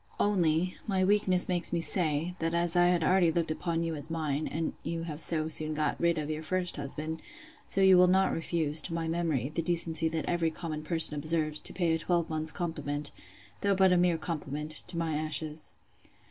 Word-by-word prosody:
—Only, 180 -3 +1
my 190 -3 +1
weakness 190 -2 +4
makes 175 -2 +2
me 170 - 0
say, 165 -1 +1
That 165 +1 -1
as 170 0 +2
I 175 0 +5
had 175 -2 +2
already 180 0 +3
looked 165 -1 -1
upon 165 +1 -2
you 165 -1 -2
as 150 0 -3
mine, 155 -2 -2
and 160 +1 -3
you 165 0 -4
have 155 -2 -6
so 155 -2 +4
soon 155 -1 +1
got 150 0 -1
rid 170 -1 +2
of 150 -1 -3
your 155 0 -4
first 180 +2 -1
husband; 155 +3 -5 0.5
so 195 - -1
you 190 -1 +6
will 180 - +6
not 190 +1 +2
refuse, 160 -2 -1
to 165 - -4
my 165 -1 -3
memory, 160 -6 -1
the 165 - -1
decency 165 -1 +1
that 160 -2 -3
every 170 -1 0
common 160 -1 -6
person 160 0 0
observes, 155 0 0
to - - +2
pay 170 -2 0
a 165 - 0
twelvemonth's 160 -2 0
compliment, 150 -4 -4 0.5
though 200 -1 +2
but 190 -1 +4
a - - +4
mere 175 -1 +2
compliment, 150 -2 -5 0.2
to 180 -1 -5
my 165 -2 -1
ashes. 155 0 -1
165 Hz, 200 wpm, -29 LUFS, 155-175 Hz, 0.5 s, you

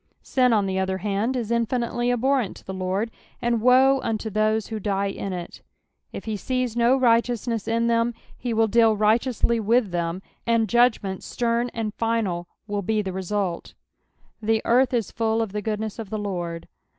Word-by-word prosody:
Sin, 250 -2 +2
on 210 -3 +3
the 190 0 -1
other 190 0 -1
hand, 210 +6 -1
is 235 -3 -2
iuBnitely 240 +1 0
abhorrent 250 -2 +1
to - - -16
tho 190 - -5
Lord, 190 +4 -2 0.3
and 235 -2 0
woe 260 +3 +5
unto 220 -1 -2
those 215 +1 +1
who 220 -1 -5
die 200 -1 0
ia 195 - -5
it; 175 -2 -6 0.5
if - - -7
he 220 -1 -2
sees 250 +2 -2
no 240 +3 +3
Tighteousness 235 -2 +1
in 230 +1 +1
them, 230 0 +1 0.3
lie 245 -2 -1
will 225 0 +3
deal 225 -1 +4
righteously 230 +2 +2
with 225 -1 +2
them, 170 +2 -2 0.2
and 230 -1 +3
judgment 225 -4 +2
stern 235 0 -1
and 220 -2 -2
final 220 -7 -1 0.2
will 205 -1 -2
be 215 +2 0
the 190 -2 -4
result. 190 -1 -3 0.3
" - - -47 0.3
The 220 0 +1
earth 250 +2 +4
is 235 -5 -1
fuU 225 0 0
of 225 -3 -1
the 210 +1 -3
goodness 215 +1 -3
of 220 -3 -6
the 215 - -3
Lard." 175 -5 -4
220 Hz, 185 wpm, -24 LUFS, 200-235 Hz, 0.5 s, woe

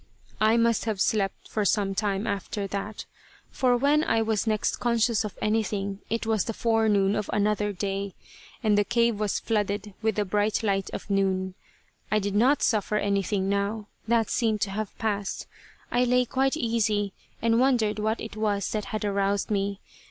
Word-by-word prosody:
I 220 +2 +4
must 230 -1 +2
have 215 -4 -2
slept 200 -1 0
for 215 - -1
some 200 0 +1
time 200 0 -1
after 200 -1 -3
that, 200 +2 -5 0.5
for 250 -2 +2
when 290 +4 +3
I 225 -6 +2
was 220 0 0
next 215 -1 +1
conscious 235 -2 +2
of 210 - -6
anything 205 -2 -1
it 230 +1 -1
was 220 -3 +1
the 225 - -4
forenoon 215 -3 +2
of 210 - -2
another 210 0 +1
day, 195 0 -3 0.5
and 215 -2 +4
the - - +4
cave 235 0 +1
was 210 -2 0
flooded 205 -2 -1
with 220 -2 +1
the 210 - 0
bright 205 +3 0
light 195 -2 0
of - - -6
noon. 190 -1 +1 0.6
I 215 - +4
did 205 -1 -1
not 255 +7 +3
suffer 210 -2 +1
anything 200 -1 0
now. 200 +2 -1 0.2
That 230 -1 +2
seemed 220 -4 +1
to 195 - 0
have 215 0 -4
passed. 205 -3 -2 0.5
I 245 - +3
lay 250 0 +3
quite 270 +4 +1
easy, 215 -5 0 0.3
and 230 0 +2
wondered 240 -5 +2
what 220 +2 0
it 220 - -7
was 210 -2 -1
that 215 -1 -2
had 215 -1 -3
aroused 200 0 0
me. 200 0 -1
210 Hz, 175 wpm, -26 LUFS, 200-225 Hz, 0.6 s, I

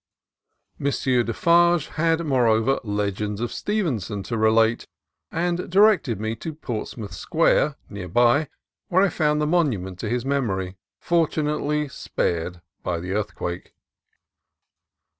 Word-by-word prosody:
M. - - -6
Defarge 155 +7 +3
had, 165 +1 0
moreover, 125 -2 +2
legends 105 -1 -2
of 120 0 -3
Stevenson 125 - -2
to 115 - -4
relate, 110 +1 +3 0.4
and 175 +2 -1
directed 190 - +4
me 110 +1 -2
to 160 +5 -6
Portsmouth 110 -7 -5
Square, 140 - +2
near 100 -3 -7
by, 120 - +3 0.4
where 185 +1 +3
I 200 - +3
found 150 -3 +1
the 150 - +1
monument 120 - 0
to 105 - -3
his 125 +2 -1
memory, 100 -10 -1 0.2
fortunately 150 -3 0
spared 85 -8 -3 0.2
by 85 -2 -2
the 90 +2 -5
earthquake. 95 -3 -4
125 Hz, 120 wpm, -23 LUFS, 105-155 Hz, 0.4 s, directed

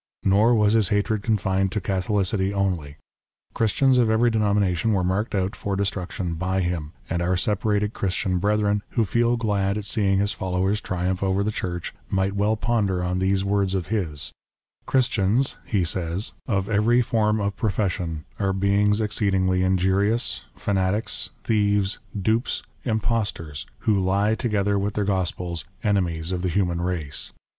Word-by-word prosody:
Nor 105 +5 +4
was 105 -1 +3
his 110 -3 +3
hatred 105 0 +1
confined 95 -3 +1
to 105 - 0
Catholicity 95 0 0
only. 90 -8 -2 0.6
Christians 125 +4 +3
of 115 -2 +3
every 115 +2 +3
denomination 105 -2 +1
were 95 -2 +1
marked 100 +5 -1
out 95 +2 0
for 100 -1 -3
des 100 - +1
truction 90 -3 -3
by 95 +1 0
him; 85 -3 -3
and 85 +1 -1
our 90 +1 +1
separated 105 +2 0
Christian 95 -1 -1
brethren, 105 +1 +1 0.2
who 115 - +4
feel 120 +4 +2
glad 100 -3 0
at 105 - -4
seeing 100 -2 +2
his 100 +1 +1
followers 95 +2 -1
triumph 90 0 -2
over 95 0 +1
the 105 - 0
Church, 90 -4 -4 0.2
might 95 0 0
well 105 +2 +1
ponder 105 -6 0
on 90 +1 -1
these 95 +1 +1
words 100 -1 +1
of 90 -2 -3
his: 85 -10 -2 0.3
" - - -49
Christians," 125 -1 +1
he 100 -5 +1
says, 85 +3 -2 0.2
"of 100 -4 0
every 115 +4 +3
form 110 -2 +1
of 100 -1 -1
profession, 90 - -1
are 95 -1 +1
beings 100 +2 +2
exceedingly 95 -3 +1
injurious, 95 +4 +1
fanatics, 100 +2 -1
thieves, 105 -2 +1 0.2
dupes, 110 +5 0 0.2
impostors, 110 - -2
who 105 -3 +2
lie 100 +3 +2
together 105 -4 0
with 100 +1 -2
their 105 - +1
gospels, 90 -3 -1 0.2
enemies 90 -5 0
of 90 -1 -2
the 90 - 0
human 85 -1 0
race." 80 -6 -3
100 Hz, 155 wpm, -24 LUFS, 95-105 Hz, 0.6 s, Nor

